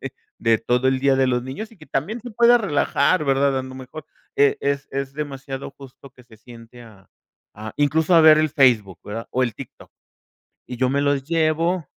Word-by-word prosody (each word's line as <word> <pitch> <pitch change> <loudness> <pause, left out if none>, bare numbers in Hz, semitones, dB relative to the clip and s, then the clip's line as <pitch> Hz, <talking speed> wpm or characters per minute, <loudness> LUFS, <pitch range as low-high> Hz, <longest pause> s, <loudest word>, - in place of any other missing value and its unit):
de - - -7 0.3
de 115 -1 +2
todo 125 +3 0
el 130 0 0
día 135 0 +2
de 135 0 +2
los 125 -1 0
niños 135 - -7
y - - -18
que 155 -4 -16
también 160 - -3
se 245 - -8
pueda 235 +2 +5
relajar, 155 -3 +1
¿verdad? 135 -1 +1
A 130 - -3
lo 130 0 -10
mejor, 135 +4 -10 0.3
eh, 140 0 +3
es 140 0 -2
es 135 0 -4
demasiado, 140 -2 -6
justo 135 0 -14
que 125 -1 -20
se 115 -2 -18
siente 115 +1 -15
a 100 -5 -18 0.5
a, 110 +1 -9
incluso 155 +4 +1
a 165 - +6
ver 155 -1 +7
el 155 0 +2
Facebook, 120 - +2
¿verdad?, 115 +3 -6
o 130 - 0
el 120 -4 -2
TikTok - - -12 0.8
y 125 - -6
yo 130 +1 0
me 140 +1 0
los 140 -1 0
llevo 165 +1 0
135 Hz, 210 wpm, -21 LUFS, 125-155 Hz, 0.8 s, ver